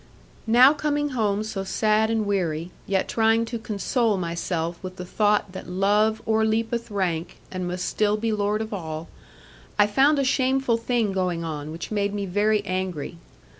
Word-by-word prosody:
Now 250 Hz, +5 st, +7 dB
coming 290 Hz, 0 st, -1 dB
home 215 Hz, -5 st, 0 dB
so 215 Hz, -3 st, -4 dB
sad 215 Hz, +2 st, +2 dB
and 225 Hz, -2 st, 0 dB
weary, 175 Hz, -4 st, -1 dB, 0.2 s
yet 195 Hz, -1 st, +1 dB
trying 225 Hz, 0 st, +2 dB
to 235 Hz, 0 st, -5 dB
console 220 Hz, +1 st, 0 dB
myself 170 Hz, -1 st, -3 dB
with 185 Hz, -1 st, -7 dB
the 180 Hz, -, -7 dB
thought 205 Hz, +1 st, +1 dB
that 185 Hz, -, -8 dB
love 205 Hz, +4 st, +2 dB
o'erleapeth 225 Hz, +2 st, +1 dB
rank, 180 Hz, -4 st, -2 dB
and 185 Hz, -1 st, -3 dB
must 180 Hz, +1 st, -3 dB
still 210 Hz, 0 st, +1 dB
be 225 Hz, +1 st, -1 dB
lord 210 Hz, +1 st, 0 dB
of 220 Hz, -, -7 dB
all, 160 Hz, -4 st, -5 dB, 0.7 s
I 205 Hz, -, +6 dB
found 270 Hz, +8 st, +3 dB
a 275 Hz, -, +2 dB
shameful 265 Hz, -2 st, +2 dB
thing 230 Hz, -2 st, 0 dB
going 180 Hz, -3 st, -1 dB
on, 155 Hz, -2 st, -5 dB
which 165 Hz, +5 st, -7 dB
made 205 Hz, -1 st, 0 dB
me 200 Hz, -1 st, -2 dB
very 205 Hz, +2 st, +1 dB
angry. 185 Hz, -4 st, -3 dB
205 Hz, 170 wpm, -24 LUFS, 185-225 Hz, 0.7 s, Now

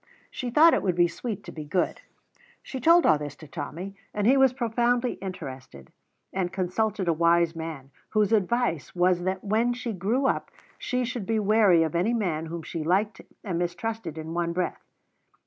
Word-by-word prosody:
She 250 Hz, -, -4 dB
thought 315 Hz, +7 st, +6 dB
it -, -, +2 dB
would 185 Hz, -3 st, 0 dB
be 175 Hz, 0 st, +4 dB
sweet 205 Hz, +4 st, -5 dB
to -, -, -9 dB
be 155 Hz, -, -7 dB
good. 175 Hz, +4 st, -1 dB, 0.6 s
She 265 Hz, -, -6 dB
told 335 Hz, +6 st, +5 dB
all 155 Hz, -, +5 dB
this 145 Hz, -1 st, -6 dB
to 155 Hz, -, -13 dB
Tommy, 170 Hz, +6 st, -6 dB, 0.2 s
and 205 Hz, -1 st, 0 dB
he 255 Hz, +5 st, +6 dB
was 265 Hz, -2 st, +5 dB
profoundly 240 Hz, 0 st, +1 dB
interested, 130 Hz, -, -8 dB, 0.4 s
and 185 Hz, -2 st, -1 dB
consulted 190 Hz, +1 st, -1 dB
a 170 Hz, -, +4 dB
wise 170 Hz, +1 st, +3 dB
man, 160 Hz, -5 st, -7 dB, 0.2 s
whose 215 Hz, 0 st, +2 dB
advice 215 Hz, -, 0 dB
was 180 Hz, 0 st, +3 dB
that 190 Hz, 0 st, -2 dB
when 225 Hz, +4 st, +1 dB
she 240 Hz, -2 st, -4 dB
grew 215 Hz, +9 st, 0 dB
up -, -, 0 dB, 0.3 s
she 250 Hz, 0 st, -1 dB
should 240 Hz, -5 st, -5 dB
be 225 Hz, 0 st, +1 dB
wary 205 Hz, -5 st, +4 dB
of 160 Hz, -, -2 dB
any 185 Hz, +8 st, +1 dB
man 165 Hz, -8 st, -1 dB
whom 165 Hz, 0 st, -6 dB
she 165 Hz, -1 st, -5 dB
liked 195 Hz, +5 st, 0 dB, 0.2 s
and 180 Hz, -5 st, -2 dB
mistrusted 175 Hz, +1 st, -3 dB
in 160 Hz, +1 st, -6 dB
one 170 Hz, 0 st, -1 dB
breath. 180 Hz, +1 st, -2 dB
190 Hz, 185 wpm, -26 LUFS, 170-225 Hz, 0.6 s, thought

